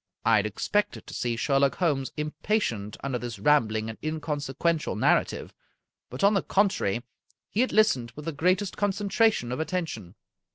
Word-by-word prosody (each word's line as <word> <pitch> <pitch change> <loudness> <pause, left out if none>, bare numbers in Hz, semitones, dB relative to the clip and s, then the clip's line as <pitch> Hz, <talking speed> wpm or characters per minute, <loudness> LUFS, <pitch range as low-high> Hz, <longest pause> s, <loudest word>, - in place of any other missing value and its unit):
I - - +5
had 105 +1 +1
expected 205 - -1
to - - -10
see 120 -1 -1
Sherlock 135 +3 +2
Holmes 145 -7 0
impatient 150 - -2
under 135 -3 -2
this 120 -1 -6
rambling 110 -7 +2
and 110 - -7
inconsequential, 155 0 -1
narrative, 110 - +1 0.6
but, 125 - -6
on 200 +2 +6
the 195 - +2
con 200 +1 +3
trary, 115 - -2 0.5
he 220 - +1
had 255 - +1
listened 215 - +3
with 150 - -9
the 165 - -1
greatest 180 +6 +1
concentration 205 - +1
of 125 - -3
attention. 160 - -3
150 Hz, 160 wpm, -27 LUFS, 120-190 Hz, 0.6 s, on